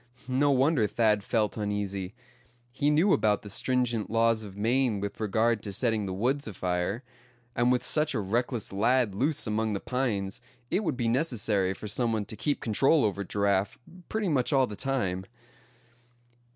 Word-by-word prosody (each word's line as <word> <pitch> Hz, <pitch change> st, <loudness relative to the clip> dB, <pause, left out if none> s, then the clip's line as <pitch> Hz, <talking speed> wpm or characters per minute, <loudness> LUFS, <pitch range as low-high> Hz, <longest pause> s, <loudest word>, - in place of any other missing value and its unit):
No 135 Hz, +3 st, +2 dB
wonder 135 Hz, -3 st, +3 dB
Thad 105 Hz, -2 st, +2 dB
felt 110 Hz, -1 st, 0 dB
uneasy. 100 Hz, -1 st, -3 dB, 0.6 s
He 140 Hz, +4 st, 0 dB
knew 165 Hz, +7 st, +4 dB
about 105 Hz, -2 st, +2 dB
the 105 Hz, -, -8 dB
stringent 120 Hz, -1 st, 0 dB
laws 115 Hz, 0 st, +2 dB
of 100 Hz, -2 st, -10 dB
Maine 120 Hz, 0 st, +1 dB
with 100 Hz, 0 st, -5 dB
regard 110 Hz, +1 st, +1 dB
to 100 Hz, -, -6 dB
setting 110 Hz, -1 st, 0 dB
the -, -, -3 dB
woods 130 Hz, +8 st, -1 dB
afire; 90 Hz, +3 st, -2 dB, 0.5 s
and 120 Hz, +1 st, +3 dB
with 125 Hz, -, +1 dB
such 150 Hz, -2 st, +1 dB
a -, -, +1 dB
reckless 115 Hz, +2 st, -2 dB
lad 115 Hz, +1 st, +2 dB
loose 140 Hz, +9 st, 0 dB
among 110 Hz, 0 st, -1 dB
the 100 Hz, -, -2 dB
pines 105 Hz, -7 st, -2 dB, 0.3 s
it 210 Hz, -, +1 dB
would 145 Hz, -, -1 dB
be 120 Hz, -2 st, 0 dB
necessary 110 Hz, -, +1 dB
for 105 Hz, -, -7 dB
some 115 Hz, +3 st, 0 dB
one 105 Hz, -2 st, -1 dB
to 110 Hz, -, -8 dB
keep 145 Hz, +5 st, -1 dB
control 135 Hz, +5 st, +3 dB
over 100 Hz, -1 st, -1 dB
Giraffe 100 Hz, 0 st, 0 dB, 0.3 s
pretty 220 Hz, -2 st, -1 dB
much 140 Hz, -6 st, +1 dB
all 135 Hz, -2 st, +4 dB
the 105 Hz, -, -7 dB
time. 95 Hz, -7 st, -2 dB
110 Hz, 170 wpm, -28 LUFS, 100-130 Hz, 0.6 s, knew